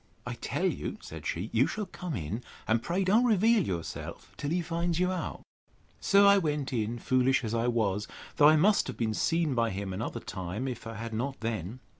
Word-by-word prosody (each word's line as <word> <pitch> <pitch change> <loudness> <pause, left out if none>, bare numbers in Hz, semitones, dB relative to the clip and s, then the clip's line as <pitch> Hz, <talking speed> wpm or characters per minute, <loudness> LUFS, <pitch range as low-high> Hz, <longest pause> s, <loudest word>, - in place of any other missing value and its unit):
I - - -3
tell - - -2
you, - - -2
said - - -8
she, 90 +7 -3
you 120 +4 +4
shall 215 -1 -3
come 180 -3 -6
in; 95 +6 -4 0.3
and 110 +1 +2
pray 175 +9 0
don't 210 +6 +4
reveal 225 -1 +4
yourself 85 - -5
till 145 - -4
he 175 +2 0
finds 170 0 -1
you 180 0 +2
out. 185 - -4 0.6
So 200 0 +5
I 200 0 +7
went 150 -6 -2
in, 115 0 -1
foolish 130 +2 +2
as 110 -1 -3
I 115 +1 +1
was; 105 -4 0 0.3
though 150 0 +8
I 155 - +6
must 200 +7 +4
have - - -5
been 110 -2 0
seen 165 +5 +1
by 115 -2 +2
him 95 -1 -4
another 110 +4 -3
time, 95 +5 -4
if 125 -3 -5
I 115 - -6
had 115 +1 -5
not 130 +5 -2
then. 110 +1 -3
125 Hz, 210 wpm, -29 LUFS, 110-170 Hz, 0.6 s, though